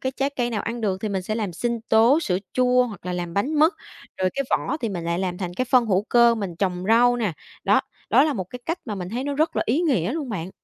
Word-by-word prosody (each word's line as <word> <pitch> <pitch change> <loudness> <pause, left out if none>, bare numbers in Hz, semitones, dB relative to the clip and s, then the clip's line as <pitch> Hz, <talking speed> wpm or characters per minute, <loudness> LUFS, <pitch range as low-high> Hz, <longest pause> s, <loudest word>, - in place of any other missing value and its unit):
cái 260 0 -2
trái 275 +1 -1
cây 245 -1 0
nào 215 -3 -2
ăn 235 +1 -4
được 195 -4 -1
thì 215 - -1
mình 190 -2 -2
sẽ 215 +4 -3
làm 210 -5 -2
sinh 235 +6 -2
tố, 235 +8 +5
sữa 185 - 0
chua 250 0 +3
hoặc 205 -5 -10
là 180 - -2
làm 175 -1 -4
bánh 255 +10 0
mứt, 320 +5 +5 0.5
rồi 185 0 +1
cái 275 - -1
vỏ - - 0
thì 230 - -1
mình 175 -5 -4
lại 170 +1 -1
làm 180 -2 -2
thành 175 -2 -4
cái 255 - -1
phân 250 -2 +3
hữu 195 -2 +2
cơ, 235 -1 +5
mình 195 -6 -5
trồng 180 -1 -1
rau 245 +2 +5
nè. 215 -7 -1 0.3
Đó, - - +4 0.3
đó 275 - +6
là 310 - +1
một 190 -8 -3
cái 250 - -7
cách 330 +2 -1
mà 215 - -4
mình 180 -3 -5
thấy 250 +4 -3
nó 285 0 -2
rất 315 +3 0
là - - +2
ý 265 +8 +2
nghĩa 250 - +1
luôn 300 -4 -4
bạn. 185 -3 -4
225 Hz, 290 wpm, -23 LUFS, 185-255 Hz, 0.5 s, đó